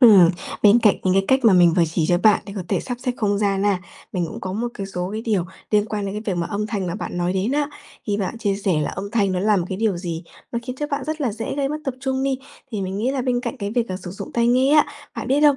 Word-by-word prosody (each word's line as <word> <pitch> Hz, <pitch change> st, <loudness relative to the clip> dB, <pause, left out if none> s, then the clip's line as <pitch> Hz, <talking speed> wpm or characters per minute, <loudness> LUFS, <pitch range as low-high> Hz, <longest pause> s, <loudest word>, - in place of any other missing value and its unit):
Ừm, 200 Hz, -9 st, +8 dB, 0.3 s
bên 210 Hz, +2 st, +7 dB
cạnh 215 Hz, -4 st, +5 dB
những 185 Hz, -1 st, +2 dB
cái 195 Hz, 0 st, +3 dB
cách 265 Hz, 0 st, +4 dB
mà 220 Hz, -, +7 dB
mình 175 Hz, -2 st, +6 dB
vừa 175 Hz, -, +5 dB
chỉ 160 Hz, -3 st, +2 dB
cho 175 Hz, -, +4 dB
bạn 210 Hz, +2 st, +4 dB
để 200 Hz, -, -7 dB
có 190 Hz, -, -2 dB
thể -, -, +1 dB
sắp 245 Hz, -1 st, -4 dB
xếp 250 Hz, -1 st, -1 dB
không 205 Hz, -3 st, +1 dB
gian 200 Hz, -1 st, +1 dB
ha, 200 Hz, -2 st, +3 dB, 0.3 s
mình 175 Hz, -2 st, 0 dB
cũng -, -, -7 dB
có 185 Hz, -, -4 dB
một 230 Hz, +5 st, -1 dB
cái 195 Hz, -, -5 dB
số 180 Hz, -1 st, -3 dB
cái 220 Hz, +1 st, -3 dB
điều 205 Hz, -7 st, +1 dB, 0.3 s
liên 210 Hz, 0 st, +3 dB
quan 210 Hz, -2 st, -3 dB
đến 195 Hz, -, -4 dB
cái 200 Hz, -4 st, -1 dB
việc 175 Hz, -, -1 dB
mà 170 Hz, -, -1 dB
âm 210 Hz, 0 st, -2 dB
thanh 205 Hz, -4 st, -2 dB
mà 175 Hz, -, -2 dB
bạn 200 Hz, -, -4 dB
nói 175 Hz, +1 st, +1 dB
đến 190 Hz, +6 st, 0 dB
á. 290 Hz, 0 st, +1 dB, 0.4 s
Khi 205 Hz, -2 st, 0 dB
bạn 205 Hz, +3 st, -3 dB
chia 205 Hz, -3 st, 0 dB
sẻ 190 Hz, -6 st, +1 dB
là 150 Hz, -, -1 dB
âm 200 Hz, +2 st, -5 dB
thanh 200 Hz, -4 st, +2 dB
nó 180 Hz, -, 0 dB
là 210 Hz, +1 st, +3 dB
một 180 Hz, -, 0 dB
cái 190 Hz, -, -3 dB
điều 215 Hz, -4 st, +1 dB
gì 170 Hz, -1 st, -4 dB, 0.3 s
nó 235 Hz, -, 0 dB
khiến 250 Hz, +1 st, -6 dB
cho 295 Hz, +2 st, -2 dB
bạn 285 Hz, -2 st, -2 dB
rất 310 Hz, 0 st, -3 dB
là 245 Hz, -7 st, 0 dB
dễ 225 Hz, +1 st, -4 dB
gây 280 Hz, -1 st, 0 dB
mất 300 Hz, -, -2 dB
tập 270 Hz, -2 st, -2 dB
trung 265 Hz, -1 st, -1 dB
đi, 270 Hz, -1 st, 0 dB, 0.3 s
thì 205 Hz, -3 st, -3 dB
mình 190 Hz, +1 st, -3 dB
nghĩ 240 Hz, +6 st, 0 dB
là 270 Hz, -2 st, -1 dB
bên 245 Hz, -1 st, +1 dB
cạnh 240 Hz, -2 st, -4 dB
cái 200 Hz, -1 st, -3 dB
việc, 235 Hz, 0 st, 0 dB
à, 185 Hz, -, -3 dB
sử 180 Hz, -1 st, -8 dB
dụng 195 Hz, -, -8 dB
tai 235 Hz, 0 st, +2 dB
nghe 260 Hz, +4 st, +4 dB
á, 300 Hz, -, +6 dB, 0.3 s
bạn -, -, -4 dB
biết 275 Hz, +3 st, +3 dB
không? 295 Hz, -2 st, +6 dB
210 Hz, 320 wpm, -22 LUFS, 190-245 Hz, 0.4 s, Ừm